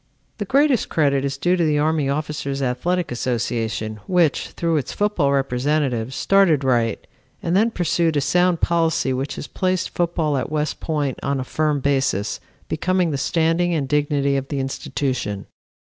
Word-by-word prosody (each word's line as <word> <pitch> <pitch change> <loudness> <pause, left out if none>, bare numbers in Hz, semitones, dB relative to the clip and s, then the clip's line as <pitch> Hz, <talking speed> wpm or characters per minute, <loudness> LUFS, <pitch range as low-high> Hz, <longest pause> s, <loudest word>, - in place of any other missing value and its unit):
"The 205 - -2
greatest 275 +3 +2
credit 140 -3 +2
is 140 0 -2
due 175 +5 +2
to 175 - +1
the 150 -2 +2
Army 150 -1 +1
Officers 140 -1 -2
Athletic 175 +7 -1
Association, 115 -3 -2
which, 175 -5 +2
through 165 -2 -1
its 140 - -3
football 205 -9 +1
representatives, 135 -2 0
started 190 -8 +3
right 120 -4 +1 0.4
and 170 +1 0
then 220 +4 +4
pursued 170 -5 0
a - - +4
sound 175 +3 +2
policy 165 -5 +1
which 135 +2 -3
has - - -6
placed 185 +1 -1
football 165 -4 0
at 130 - -2
West 150 0 -1
Point 145 -5 -2
on 140 0 -1
a - - -2
firm 150 +1 0
basis, 135 -8 0 0.3
becoming 185 -2 0
the 140 - -1
standing 165 +3 +1
and 140 -4 -1
dignity 145 -1 +1
of 135 0 -3
the 140 -1 -3
institution. 130 -6 -3
150 Hz, 165 wpm, -21 LUFS, 135-170 Hz, 0.4 s, then